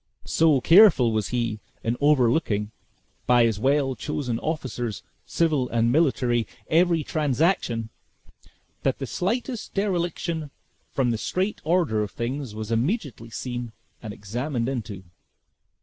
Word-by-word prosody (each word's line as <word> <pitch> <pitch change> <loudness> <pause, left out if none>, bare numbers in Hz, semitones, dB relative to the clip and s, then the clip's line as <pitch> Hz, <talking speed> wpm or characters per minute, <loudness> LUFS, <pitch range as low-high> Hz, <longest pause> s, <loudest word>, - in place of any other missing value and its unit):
So 155 -5 +3
careful 165 - +6
was 110 -2 0
he, 115 -3 -2 0.2
in 115 +1 0
overlooking, 125 -6 +2 0.6
by 125 -1 +5
his 110 -3 +1
well 135 +1 +2
chosen 125 -6 -3
officers, 125 - -3 0.2
civil 150 -7 +1
and 115 0 +2
military, 125 -6 +2 0.2
every 170 -1 +3
transaction, 145 - 0 0.9
that - - 0
the - - -4
slightest 235 +5 -3
dereliction 175 -5 -1 0.4
from 130 -3 +1
the 115 - -2
straight 190 - -2
order 160 -10 +1
of 105 - -2
things 120 +1 -4
was 110 +1 -5
immediately 125 - -1
seen 120 0 -5 0.3
and 110 - -6
examined 120 +5 -3
into. 110 -7 -4
130 Hz, 120 wpm, -25 LUFS, 115-160 Hz, 0.9 s, careful